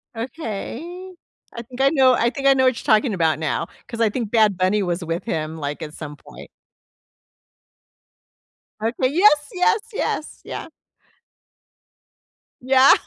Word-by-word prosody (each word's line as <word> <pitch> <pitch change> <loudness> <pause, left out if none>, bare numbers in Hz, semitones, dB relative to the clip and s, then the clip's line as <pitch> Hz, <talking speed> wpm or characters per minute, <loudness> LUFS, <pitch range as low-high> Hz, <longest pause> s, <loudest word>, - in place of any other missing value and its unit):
Okay. 310 - -6 0.4
I 235 - -5
think 245 +2 -12
I 275 - +5
know 265 -4 +5
I 235 -1 +2
think 275 +1 -6
I 275 - +7
know 260 -1 +2
what 255 -2 +3
you're 220 - +4
talking 215 +1 +2
about 160 -3 +1
now, 160 +1 -2 0.2
'cause 230 -1 -5
I 220 - +4
think 225 -2 -4
Bad 215 -5 +3
Bunny 190 +2 +2
was 175 0 -2
with 165 +1 -3
him, 160 -6 -3
like, 145 -1 -5
at 150 0 -6
some 150 -3 -8
point. - - -13 2.3
Okay 255 +3 0
yes! 305 - +4
Yes, 365 +3 +3
yes, 315 -6 -3
yeah. - - -6 1.9
Yeah. 260 +1 +6
230 Hz, 145 wpm, -22 LUFS, 180-270 Hz, 2.3 s, I